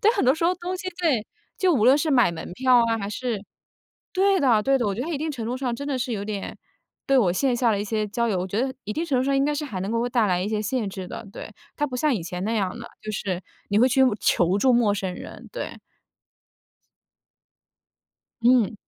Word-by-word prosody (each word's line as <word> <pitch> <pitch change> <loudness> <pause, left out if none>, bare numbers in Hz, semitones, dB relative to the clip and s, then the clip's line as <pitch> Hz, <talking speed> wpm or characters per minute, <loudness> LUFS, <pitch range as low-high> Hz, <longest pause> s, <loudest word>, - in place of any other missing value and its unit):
对， 435 - +6
很 - - 0
多 260 +3 +5
时 325 - -2
候 350 - +4
东 365 +1 -4
西 370 0 -5
对， 280 -11 +2 0.3
就 370 -2 +3
无 230 -8 +2
论 260 +3 +7
是 305 +1 0
买 245 -10 +4
门 165 - -7
票 255 +2 +3
啊， 225 0 0
还 200 - -4
是 225 -1 -3 0.7
对 390 +1 +3
的 240 -8 +3
对 270 +2 +3
的， 240 - 0
我 200 - 0
觉 220 - -4
得 265 - -3
它 340 - -2
一 285 - -2
定 315 +1 -2
程 250 -6 -5
度 245 +3 -2
上 255 -2 -2
真 280 +4 -5
的 270 -3 -1
是 245 0 -2
有 200 -2 -3
点 205 -2 -5 0.5
对 275 -1 +4
我 185 -7 +3
线 250 +5 +1
下 235 -2 +2
的 200 - 0
一 205 - -2
些 215 0 -1
交 235 +3 -1
友， 195 - 0
我 180 - -2
觉 200 +4 -1
得 260 +1 -1
一 210 - -3
定 325 - -2
程 275 -6 +1
度 255 - +1
上， 275 0 +1
应 275 - +3
该 295 - +1
是 300 - -3
还 205 -10 -5
能 195 +3 -3
够 230 +1 0
带 235 -3 +2
来 180 -1 +1
一 195 - -2
些 215 -1 -1
限 220 0 -1
制 190 -1 -7
的， 225 +2 -7
对。 - - -8 0.3
它 295 - 0
不 255 -3 -5
像 295 +2 +2
以 195 - -3
前 180 +2 -5
那 220 - -1
样 200 +1 -1
的， 235 - -8 0.2
就 215 - -4
是， 190 -3 -3 0.3
你 205 - +3
会 250 +3 +5
去 265 +1 +3 0.2
求 175 +2 +2
助 255 +4 +4
陌 235 -4 +3
生 190 -2 -3
人， - - -10
对。 - - -5 2.7
嗯。 240 -3 +4
235 Hz, 275 characters per minute, -24 LUFS, 205-275 Hz, 2.7 s, 论